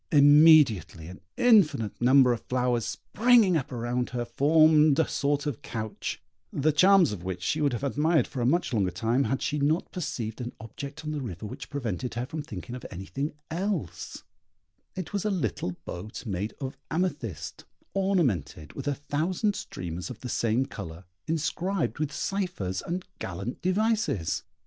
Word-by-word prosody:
Immediately 145 - +6
an 95 - -11 0.2
infinite 185 - +4
number 130 0 +6
of 115 - -4
flowers, 125 -2 0
springing 225 -4 +3
up 140 -4 -1
around 120 0 -2
her, 120 -1 -3
formed 155 +3 +5
a 160 - +3
sort 145 +1 0
of 145 -6 -3
couch, 110 -2 -5 0.3
the 155 +3 +2
charms 185 - +5
of 95 -5 -6
which 90 -1 -4
she 155 - 0
would 145 -3 +2
have 120 - -4
admired 150 +1 +2
for 130 - -5
a - - +1
much 165 -1 +1
longer 100 -5 +2
time 115 +9 0
had 135 - -1
she 150 - -1
not 150 +5 +1
perceived 120 -9 -4
an 120 0 -5
object 140 +7 -8
on 155 - -2
the 150 -2 -3
river 105 -6 -6
which 130 +7 -8
prevented 125 - -3
her 120 +1 -2
from 155 +3 -5
thinking 120 -3 -8
of 125 - -7
anything 110 - -4 0.2
else; 165 - -3 0.7
it 185 0 -6
was 200 - -1
a 215 - 0
little 125 - -1
boat 105 +9 -7
made 100 0 -3
of 135 -1 -5
amethyst, 150 - -3 0.3
ornamented 150 - 0
with - - -6
a 145 - +1
thousand 170 - -1
streamers 90 0 -6
of 120 -3 -9
the 125 - -5
same 120 +3 +1
colour, 85 - -8 0.2
inscribed 165 +3 -1
with 150 -1 -1
cyphers 175 - -2
and 180 +2 -4
gallant 100 +6 -5
devices. 200 - +1
140 Hz, 165 wpm, -27 LUFS, 115-160 Hz, 0.7 s, Immediately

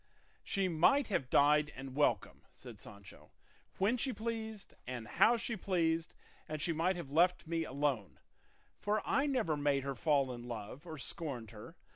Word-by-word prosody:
"She 195 -1 0
might 185 - +3
have 135 -10 -1
died 150 +1 +4
and 130 0 -8
welcome," 145 0 +1
said - - -11
Sancho, 95 -7 -13 0.5
"when 210 +6 +2
she 260 +2 0
pleased 220 -2 -5
and 120 -3 -5
how 235 - +4
she 230 0 -2
pleased; 165 -5 0 0.3
and 155 0 -3
she 165 +3 0
might 170 +4 +1
have 170 -6 -7
left 175 +3 +3
me 165 0 -1
alone, 135 - -1 0.6
for 210 0 0
I 280 +1 +2
never 240 - +1
made 145 -2 +1
her 140 0 -2
fall 140 0 +2
in 120 0 -8
love 120 +7 -7
or 160 -1 -6
scorned 135 -7 -4
her. 115 +10 -11
155 Hz, 165 wpm, -34 LUFS, 135-190 Hz, 0.6 s, died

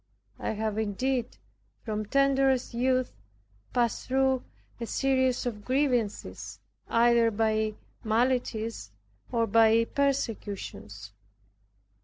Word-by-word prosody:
I - - -2
have 220 0 -2
indeed, 240 +4 -1 0.5
from 215 -2 -3
tenderest 270 -1 +2
youth, 255 +1 +1 0.6
passed 235 -3 0
through 265 0 +2 0.4
a 230 - -4
series 260 -1 +1
of 215 -4 -4
grievances, 215 - -1 0.3
either 235 0 +4
by 215 0 0 0.3
maladies 230 - 0 0.4
or 230 -2 +2
by 225 +1 +5
persecutions. 205 - -3
230 Hz, 90 wpm, -28 LUFS, 215-260 Hz, 0.6 s, by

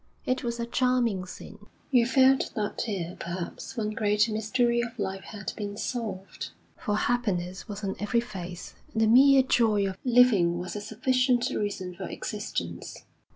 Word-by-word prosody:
It 255 - 0
was 235 -1 -3
a 235 - -1
charming 235 -6 +1
scene. 205 +3 -11 0.2
You 240 -3 +5
felt 265 +1 +4
that 210 -2 -2
here, 180 -5 -3
perhaps, 175 +8 -6
one 215 -2 -1
great 210 0 +2
mystery 235 +3 +1
of 235 0 -5
life 195 -2 -3
had 200 -3 -6
been 205 -1 -5
solved; 215 -6 -4 0.3
for 210 -2 -1
happiness 195 -6 -1
was 205 -1 -7
on 195 -1 -2
every 220 +3 +1
face, 180 -6 -7 0.2
and 225 - 0
the - - +4
mere 265 +3 +7
joy 220 -6 +3
of 190 -1 -6
living 235 -9 +5
was 180 +3 -5
a 210 - -3
sufficient 250 +3 +1
reason 195 -3 -3
for 190 +2 -6
existence. 85 - -5
215 Hz, 160 wpm, -27 LUFS, 195-240 Hz, 0.3 s, mere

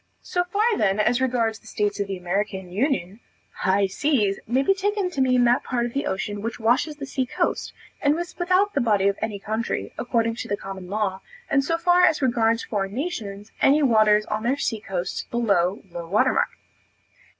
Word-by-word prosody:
So 355 - 0
far 400 +4 0 0.2
then 195 0 +2
as 240 +4 +2
regards 230 -4 0
the - - -19
states 205 0 -1
of 200 - -1
the 195 -1 -4
American 190 +1 -3
union, 210 - -1 0.4
"high 195 +1 +2
seas," 210 -1 +1
may 255 +4 +2
be 390 - +4
taken 395 -1 -1
to 280 - -1
mean 255 -1 +4
that 245 +1 +3
part 240 -2 -1
of 240 - -5
the 280 - -1
ocean 205 +2 -3
which 230 +3 -4
washes 245 +7 +1
the 285 -1 -6
sea 265 -2 -2
coast, - - -1 0.3
and 290 +1 +3
is 345 +1 -5
without 370 +3 +2
the 280 - +1
body 205 -4 +2
of 200 - 0
any 215 -2 -2
country, 220 +3 -3
according 230 -2 0
to - - -5
the 205 - -1
common 195 -2 -8
law; 200 -2 -1 0.3
and 275 0 +3
so 330 +4 0
far 355 +1 +4
as 315 - +4
regards 230 -3 +2
foreign 200 -1 -3
nations, 220 - -5
any 290 +2 +5
waters 215 -4 +4
on 215 0 -2
their 250 +5 0
sea 225 -5 -1
coasts, 185 -3 -4
below 200 -5 +1
low 170 -1 -6
water 200 +5 +3
mark. - - +1
225 Hz, 200 wpm, -24 LUFS, 200-275 Hz, 0.4 s, any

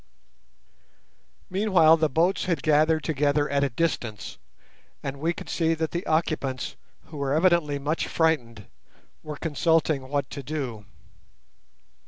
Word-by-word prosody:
Meanwhile 185 -5 +4
the 155 -1 +1
boats 170 +7 +1
had 170 -7 -1
gathered 155 +1 +3
together 145 -1 +1
at 140 0 +1
a 140 - +1
distance, 120 -6 -3 0.6
and 140 0 -5
we 165 +3 +1
could - - -8
see 165 -1 +1
that 160 0 -2
the 175 +2 -4
occupants, 155 -5 -1 0.3
who 155 - -11
were 140 0 0
evidently 165 -4 +3
much 145 +4 -2
frightened, 120 - 0 0.6
were 150 -1 -7
consulting 155 -3 +1
what 140 -2 -1
to 140 - -6
do. 130 -7 -5
155 Hz, 130 wpm, -25 LUFS, 140-165 Hz, 0.6 s, Meanwhile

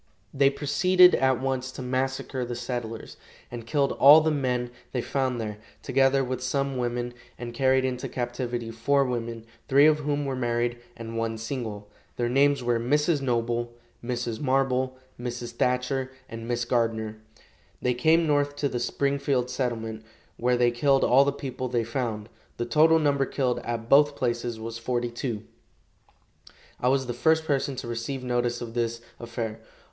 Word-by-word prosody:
They 140 0 +4
proceeded 180 +6 +4
at 130 -2 +2
once 130 -1 -2
to 130 - -6
massacre 130 0 -2
the 120 0 -4
settlers, 120 -2 -5 0.3
and 120 -1 -7
killed 140 +2 +1
all 145 +3 +8
the 160 0 +1
men 125 -4 -1 0.2
they 125 - 0
found 130 -3 -1
there, 105 -2 -5 0.2
together 135 0 +3
with 130 0 -3
some 135 +1 -1
women, 120 0 -2 0.2
and 120 -1 -6
carried 130 +1 +3
into 125 -1 -3
captivity 120 -1 -3
four 135 +5 +2
women, 115 -2 -4 0.2
three 140 +1 +6
of 155 0 +5
whom 145 -1 -1
were 135 -1 -2
married 120 -1 -1 0.2
and 115 0 -5
one 115 0 -2
single. 110 -3 -5 0.3
Their 120 -1 -1
names 140 +1 +3
were 120 -1 +1
Mrs. 150 +5 +1
Noble, 120 -2 -1 0.3
Mrs. 120 -2 -3
Marble, 130 -1 +1 0.2
Mrs. 120 -1 -5
Thatcher 125 +2 0 0.2
and 115 0 -8
Miss 120 -1 -1
Gardner. 115 -3 0 0.6
They 125 - +1
came 160 +7 +3
north 145 -1 +1
to 145 -1 -1
the 125 - -3
Springfield 140 0 0
settlement, 115 -4 -3 0.3
where 125 +1 +1
they 120 0 +3
killed 135 +3 +2
all 135 +3 +5
the 140 - +2
people 130 -2 -5
they 120 -2 0
found. 115 -3 -3 0.3
The 120 - -2
total 155 +6 +5
number 140 -3 +2
killed 125 -3 0
at 115 -1 -4
both 145 +2 +5
places 120 -2 -2
was 115 +1 -6
forty 120 0 -2
two. 120 -3 -4 1.4
I 125 - +2
was 135 0 +2
the 120 - -3
first 160 +6 +2
person 140 -2 0
to 125 - -6
receive 120 +3 -4
notice 120 -1 -1
of 115 -1 -6
this 115 -1 -1 0.2
affair. 115 -2 -5
125 Hz, 165 wpm, -26 LUFS, 120-135 Hz, 1.4 s, all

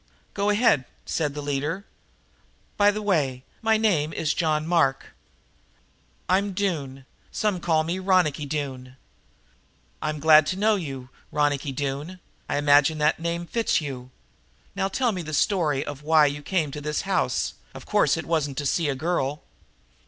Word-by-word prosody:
"Go 200 0 0
ahead," 205 - +3 0.2
said 150 -3 -2
the 145 - -5
leader. 145 +7 -2 0.9
"By 205 0 +5
the 210 +1 -2
way, 140 -10 0 0.2
my 220 -1 +3
name 175 -9 +1
is 155 -1 0
John 155 -2 0
Mark." 160 -6 +1 1.1
"I'm 195 +1 +1
Doone 145 -9 -3 0.3
some 210 -4 0
call 160 -2 +1
me 170 +4 -2
Ronicky 180 -6 +2
Doone." 135 -3 -5 1.0
"I'm 155 0 -2
glad 155 0 +6
to - - -1
know 215 +2 +3
you, 135 -9 -6 0.2
Ronicky 145 -1 0
Doone. 145 +6 -4 0.3
I - - 0
imagine 145 +2 +4
that 150 +1 +2
name 170 +1 -2
fits 230 +6 +1
you. 130 -5 -6 0.7
Now 195 -1 0
tell 240 +4 0
me 185 -4 -4
the 155 -2 -4
story 150 -5 +1
of 145 -1 -7
why 155 0 +5
you 145 0 -2
came 160 -3 -1
to 150 - -6
this 150 +1 -2
house; - - 0 0.2
of - - -10
course - - +2
it - - -4
wasn't 150 -5 -1
to 145 - -2
see 155 +2 +1
a 135 - -1
girl!" 150 -1 -2
155 Hz, 160 wpm, -25 LUFS, 145-185 Hz, 1.1 s, glad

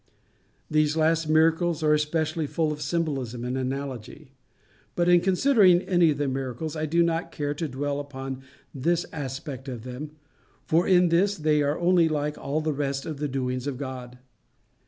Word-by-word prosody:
These 155 0 +1
last 160 0 +2
miracles 160 +1 +3
are 150 0 +4
especially 155 +1 0
full 155 +1 0
of 150 0 -6
symbolism 140 -7 -2
and 125 +1 -2
analogy. 130 +1 -5 0.6
But 175 0 +1
in 175 -1 +6
considering 190 -2 +4
any 175 -3 +3
of 145 - 0
the 145 -1 -1
miracles, 135 +4 -3
I 155 0 -2
do 170 +3 +3
not 165 0 -1
care 145 -2 -2
to 160 +2 -3
dwell 140 +1 -3
upon 135 -2 -6 0.3
this 170 +5 0
aspect 135 -2 -6
of 120 -3 -6
them, 130 +4 -6 0.6
for 165 +3 +2
in 180 -2 +5
this 195 +4 +2
they 150 -1 +2
are 145 +1 0
only 175 -1 +3
like 150 -1 -1
all 145 +3 -2
the 155 -1 -1
rest 140 -1 -2
of 155 -3 -5
the 150 - -1
doings 130 -1 -2
of 135 -3 -3
God. 130 -2 -7
150 Hz, 175 wpm, -26 LUFS, 135-165 Hz, 0.6 s, in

